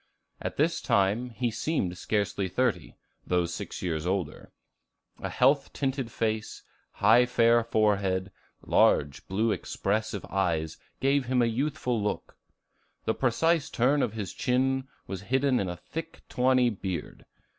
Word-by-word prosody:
At - - -4
this - - +1
time, 105 +6 +1
he 120 0 -2
seemed 110 - -1
scarcely 100 0 -1
thirty, 125 +5 -1 0.3
although 90 -1 +1
six 85 - -6
years 80 -2 -2
older; 90 -5 -3 0.7
a - - -4
health 135 +2 +3
tinted 135 -4 -2
face, 110 -1 -2 0.3
high 125 +2 +5
fair 115 -1 +4
forehead, 100 -4 +1 0.3
large 70 0 +2
blue 110 +4 +1
expressive 105 0 -2
eyes, 85 -5 -1 0.2
gave 135 0 +2
him 125 -1 +2
a - - +4
youthful 125 -1 -1
look. 105 - -3 0.7
The 110 - +2
precise 150 +6 +1
turn 135 +5 +2
of 115 -5 0
his 105 -5 -5
chin 130 +1 0 0.2
was 95 -2 -6
hidden 130 +4 +1
in 95 - -1
a 90 - -5
thick 165 - -8
tawny 125 -1 +3
beard. 95 -3 -5
115 Hz, 135 wpm, -28 LUFS, 95-130 Hz, 0.7 s, high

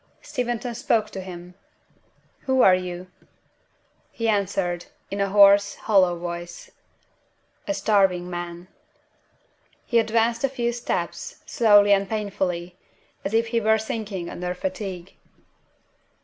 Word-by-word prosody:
Steventon 245 -4 -3
spoke 225 -2 0
to 190 - -6
him. 180 -1 -9 0.9
"Who 260 -1 +4
are 190 - +7
you?" 180 -1 -3 1.1
He 230 - -3
answered, 195 -4 -1 0.2
in 200 0 -2
a 200 - +1
hoarse, 200 0 +6
hollow 185 -5 +2
voice, 175 0 -7 1.0
"A 300 - -1
starving 195 -6 +2
man." 175 0 -6 1.2
He 235 - +3
advanced 230 +2 +1
a 275 - +2
few 240 -2 -1
steps, 240 0 -4
slowly 205 -3 +5
and 195 -1 +1
painfully, 185 -5 -3 0.5
as 200 +3 -2
if 230 0 +2
he 230 0 0
were 220 0 +3
sinking 215 -5 -4
under 180 +1 -4
fatigue. 185 -1 -5
200 Hz, 120 wpm, -24 LUFS, 180-225 Hz, 1.2 s, are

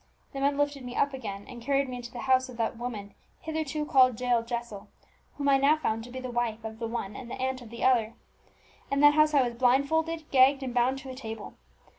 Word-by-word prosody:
The 275 - -4
men 280 +1 +1
lifted 290 -2 -1
me 245 0 -7
up 280 - +1
again, 205 -6 -6
and 245 -2 -10
carried 275 +2 +1
me 250 -1 -5
into 240 -1 -8
the 240 - -7
house 260 -1 +2
of 245 - -10
the 225 -1 0
woman 225 -4 -6 0.3
hitherto 315 -2 -3
called 255 -5 +4
Jael 245 -2 +2
Jessel, 235 -3 -6 0.5
whom 285 -1 -2
I 275 -1 +5
now 285 +3 +4
found 225 -7 -2
to - - -11
be 260 +1 -6
the 255 -1 -6
wife 235 -2 -2
of 220 0 -7
the 230 - -3
one 225 -3 -4
and 245 - -8
the - - -5
aunt 260 0 -2
of 235 - -11
the 235 +1 -7
other. 235 -4 +3 0.7
In 280 0 +1
that 290 0 +8
house 305 0 +4
I 275 - +5
was 240 -1 -2
blindfolded, 310 +6 +2
gagged, 270 +1 +5
and 255 -2 -4
bound 250 +2 +2
to 265 -2 -8
a - - -7
table. 225 -4 -7
255 Hz, 240 wpm, -28 LUFS, 235-275 Hz, 0.7 s, that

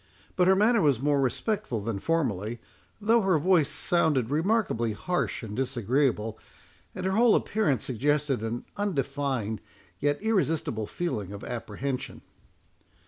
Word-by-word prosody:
But 180 -1 +3
her 190 - +6
manner 220 +3 +4
was 140 -6 +3
more 140 +1 +2
respectful 160 - -1
than 105 -1 -3
formerly, 120 - -1 0.4
though 225 +2 +3
her 190 -4 +3
voice 165 -2 +3
sounded 150 -8 +1
remarkably 155 - +1
harsh 175 - -2
and 105 -2 -6
disagreeable, 120 -3 0 0.6
and 185 - -4
her 190 - +1
whole 225 +2 +5
appearance 150 - +1
suggested 140 +1 0
an 115 +2 -3
undefined, 140 - -1 0.4
yet 145 +4 +1
irresistible 165 - 0
feeling 130 - -3
of 100 0 -8
apprehension. 125 +3 -4
140 Hz, 130 wpm, -27 LUFS, 115-185 Hz, 0.6 s, her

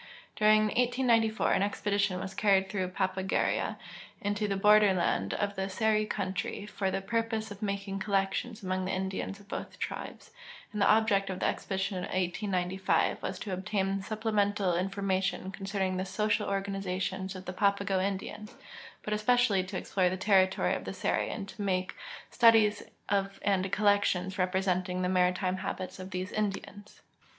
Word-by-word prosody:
During 215 0 +5
1894 240 -2 +2
an - - +2
expedition 200 -1 0
was 190 0 -5
carried 195 -1 +3
through 190 -3 -1
Papagueria 190 0 -1 0.4
and 205 - -2
into 210 0 -1
the 195 -1 -1
borderland 195 - +4
of 200 0 -1
the 190 0 -2
Seri 215 +1 +1
country 190 0 -3
for 200 -2 -2
the 190 0 -2
])urpose 225 0 -1
of 205 - -9
making 200 -1 -3
collections 200 +3 -1
among 185 0 -1
the 185 - -2
Indians 190 +1 -3
of 200 - -17
both - - -6
tril)es, - - -6 0.4
and 210 - -2
the - - +5
object 210 -2 +3
of 185 -1 -4
the - - -1
expedition 190 0 -1
of 180 - -3
1895 185 0 0
was 190 - -3
to 195 0 -5
obtain 195 +1 -1
supplemental 205 -3 0
information 190 0 -1
concerning 195 -1 -2
the 185 - -1
social 210 +2 0
organization 195 -1 -2
of 185 0 -8
the 185 - -5
Papago 200 0 +1
Indians, 200 +2 -4 0.5
but 210 - -2
especially 215 -2 +3
to 185 +1 -5
explore 185 -1 +1
the 185 - -3
territoiy 190 -1 +3
of - - -6
the - - -4
Seri - - 0
and 200 -3 -5
to 205 - -9
make 185 -2 -1 0.4
studies 225 -3 +5 0.3
of 195 -1 0
and 195 -1 +1
collections 200 -2 +2
repre 185 +1 +1
senting 185 0 0
the 180 - +1
maritime 185 0 +2
habits 185 0 -5
of 185 0 -7
these 185 0 -4
Indians. 205 0 -4
195 Hz, 160 wpm, -30 LUFS, 185-210 Hz, 0.5 s, During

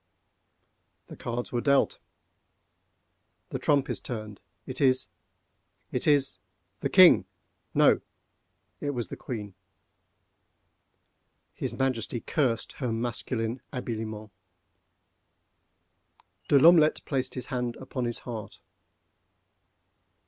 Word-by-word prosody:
The - - -11
cards 120 +1 -4
were 120 - -1
dealt. 140 0 +2 1.5
The - - -4
trump 140 -2 +2
is - - -3
turned—it 110 -5 -8
is—it 130 -1 -3
is—the 100 - -1
king! 185 - +7 0.5
No—it 145 - -1
was 120 -8 -3
the - - -5
queen. 105 -5 -6 2.0
His - - -4
Majesty 125 -3 -1
cursed 120 -3 -1
her 125 -4 -2
masculine 115 +1 -2
habiliments. 110 -4 -5 2.1
De 140 - +5
L'Omelette 160 +1 +6
placed 130 -2 -2
his 125 - -4
hand 125 -1 -1
upon 130 -1 -4
his 120 -1 -1
heart. 115 -4 -7
125 Hz, 85 wpm, -28 LUFS, 110-135 Hz, 2.1 s, king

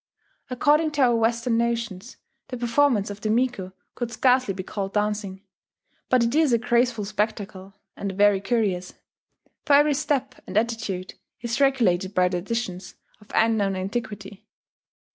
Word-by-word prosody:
According 295 +5 +2
to 295 - 0
our 240 -2 +4
Western 230 +1 +1
notions. 235 -2 -3 0.3
the 250 - -6
performance 240 -3 +2
of 205 0 -9
the 215 - -2
miko 230 -5 0 0.2
could 240 -1 -4
scarcely 255 -2 +2
be 190 -1 -5
called 195 0 -5
dancing; 205 -2 -2 0.7
but 255 -2 +4
it 230 +1 0
is 310 -2 +3
a 235 - +4
graceful 235 -2 +1
spectacle, 205 -2 -4 0.2
and 200 - -4
very 205 0 +3
curious, 195 -5 -1 0.7
for 290 - +2
every 295 +1 +5
step 275 -2 -2
and - - -3
attitude 220 -5 -2 0.3
is 235 +3 -2
regulated 205 -9 +2
by 180 0 +3
traditions 185 0 -4 0.2
of 210 - -21
unknown 220 -3 +2
antiquity. 200 0 -5
225 Hz, 145 wpm, -24 LUFS, 195-245 Hz, 0.7 s, every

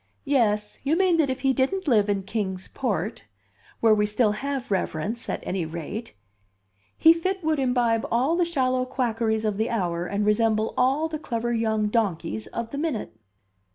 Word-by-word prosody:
"Yes, 210 -7 +1
you 295 +4 +1
mean 370 -3 +3
that 305 -4 +2
if 260 0 -3
he 270 0 +3
didn't 330 +9 0
live 210 -6 +3
in 200 -1 0
Kings 190 -2 -3
Port 215 -4 -2 0.6
(where 225 -1 +6
we 210 0 +2
still 210 +1 +2
have 265 +2 -4
reverence, 200 +5 -2
at - - -2
any 185 -2 -2
rate), 170 - -6 0.8
he 325 - +7
fit 370 +3 -2
would 310 -1 +1
imbibe 245 -3 +1
all 260 +8 +2
the 350 - +2
shallow 255 -6 +1
quackeries 230 -4 -1
of 210 -2 0
the 220 +2 0
hour 175 -5 -1
and 200 +2 -1
resemble 215 +1 +2
all 270 +5 +2
the 310 -1 -5
clever 240 -4 -2
young 220 -2 +1
donkeys 170 - -1
of 230 - -5
the 280 - -4
minute." 275 - -2
230 Hz, 175 wpm, -25 LUFS, 210-270 Hz, 0.8 s, he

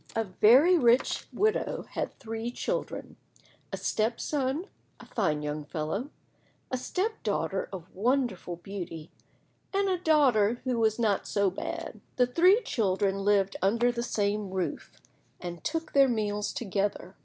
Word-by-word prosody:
A 225 - +2
VERY 250 - +5
rich 240 0 +3
widow 435 +2 0
had - - -4
three 225 0 -4
children, - - -4 0.5
a - - -3
step 225 +2 0
son, 285 +3 -1 0.3
a - - -12
fine 155 -9 -1
young 150 0 -3
fellow, 160 - -3 0.6
a 255 - 0
step 425 - -2
daughter 200 -2 -1
of 185 -3 -9
wonderful 230 -5 0
beauty, 175 -3 -7 0.6
and 395 0 +1
a 370 -2 +1
daughter 250 - +3
who 250 -3 0
was 220 -1 +2
not 215 -4 +1
so 200 -2 +1
bad. 190 - -6
The 250 - +4
three 365 - +4
children 195 - 0
lived 195 -1 +2
under 230 +6 +3
the 235 -1 -3
same 210 -3 -1
roof, 185 -1 -3 0.5
and 175 -1 -7
took 325 -1 -3
their 275 -1 +6
meals 210 -3 -1
together. 195 -3 -2
220 Hz, 145 wpm, -29 LUFS, 195-260 Hz, 0.6 s, their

